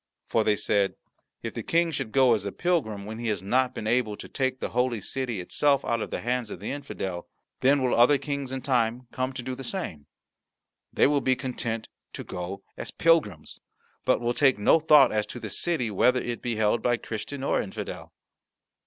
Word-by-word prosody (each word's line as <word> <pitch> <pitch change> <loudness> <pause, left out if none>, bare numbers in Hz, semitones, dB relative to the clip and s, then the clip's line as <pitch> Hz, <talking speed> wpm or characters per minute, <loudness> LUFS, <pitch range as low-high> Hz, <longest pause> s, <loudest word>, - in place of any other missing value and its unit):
"For," 115 - +2
said 100 -1 +1 0.5
they, - - -2
"if - - -17
the - - -4
King 170 0 +1
should 135 -7 -3
go 130 -2 +5
as 105 -4 0
a 100 - -3
pilgrim, 110 - -1
when 110 +2 -6
he 120 - -3
has 105 -4 -1
not 125 +5 +1
been - - -5
able 110 -2 +1
to - - -9
take 130 -1 -1
the - - -3
Holy 125 -1 0
City 120 0 -3
itself 140 +9 +1
out 115 -1 0
of - - -4
the - - -4
hands 120 -1 -1
of 90 - -7
the 105 - -4
infidel, 95 -11 -5 0.3
then 135 +1 +3
will 125 - +2
other 125 +5 +6
Kings 140 -2 -4
in 130 -1 -4
time 120 -2 +1
to - - -24
come 130 +1 -2
do 130 0 -5
the 135 - -7
same. 120 - -5 0.8
They - - +3
will 145 0 +3
be 130 - +2
content 120 -4 -3 0.3
to - - -6
go 95 +2 -6
as - - -5
pilgrims, 155 - +1 0.4
but - - +2
will 120 0 0
take 135 -2 +4
no 105 +10 +4
thought 150 -4 +6
as 105 -1 0
to 120 - -7
the 110 -4 -6
city, 130 - 0
whether 125 +6 +3
it 120 -1 -4
be 120 -2 -2
held 110 +1 +2
by 120 +1 +2
Christian 125 +5 -6
or - - +1
infidel." 95 - -7
125 Hz, 210 wpm, -27 LUFS, 110-135 Hz, 0.8 s, other